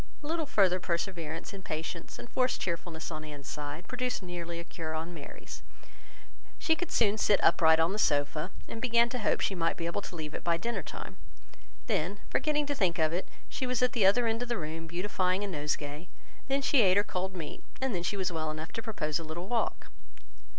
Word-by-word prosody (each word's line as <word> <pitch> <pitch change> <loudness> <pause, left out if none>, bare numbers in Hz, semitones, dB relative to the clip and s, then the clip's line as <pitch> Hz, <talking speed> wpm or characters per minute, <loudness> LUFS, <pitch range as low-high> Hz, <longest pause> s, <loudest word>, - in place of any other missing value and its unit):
A - - -7
little 320 0 -1
further 190 -8 +4
perseverance 170 -2 -2
in 195 - -7
patience 165 0 -4
and - - -8
forced 255 +1 +1
cheerfulness 170 -2 -3
on 155 -1 -4
Anne's 145 -2 -8
side 150 +4 -5
produced 250 -4 -1
nearly 170 -1 -4
a - - -4
cure 160 -2 -5
on 165 +2 -3
Mary's. 150 -4 -8 1.0
She 320 - +3
could 355 +2 -3
soon 215 -1 +3
sit 205 - +5
upright 160 -2 +6
on 165 +3 +3
the 210 - -2
sofa, 150 +1 +2 0.2
and 225 - -6
began 235 -1 +4
to 250 - -2
hope 210 - +2
she - - +1
might 165 -3 +1
be 165 - -3
able 170 +4 -1
to 185 - -8
leave 155 -2 -5
it - - -5
by 170 -1 +3
dinner 230 +2 -2
time. - - -8 0.7
Then, 185 +6 0
forgetting 300 -1 +2
to 285 - 0
think 185 -10 +2
of 160 -1 +3
it, 180 - -2 0.2
she 260 - -3
was 250 -1 +1
at 250 - +4
the 215 -7 +5
other 235 +5 +5
end 225 +1 +1
of 245 - -3
the 240 - +1
room, 165 0 -4
beautifying 185 +2 0
a - - -1
nosegay; 150 -1 -2 0.4
then, 275 +1 +1
she 275 -2 +5
ate 190 -2 +5
her 205 - +5
cold 185 -1 -3
meat; 160 -4 -6 0.2
and 265 -2 0
then 175 - 0
she 190 +4 -1
was 185 -2 0
well 160 -2 -1
enough 155 +1 -5
to 225 - -3
propose 170 -9 -1
a - - -5
little 165 +3 -5
walk. 230 +1 -1
180 Hz, 220 wpm, -31 LUFS, 160-225 Hz, 1.0 s, upright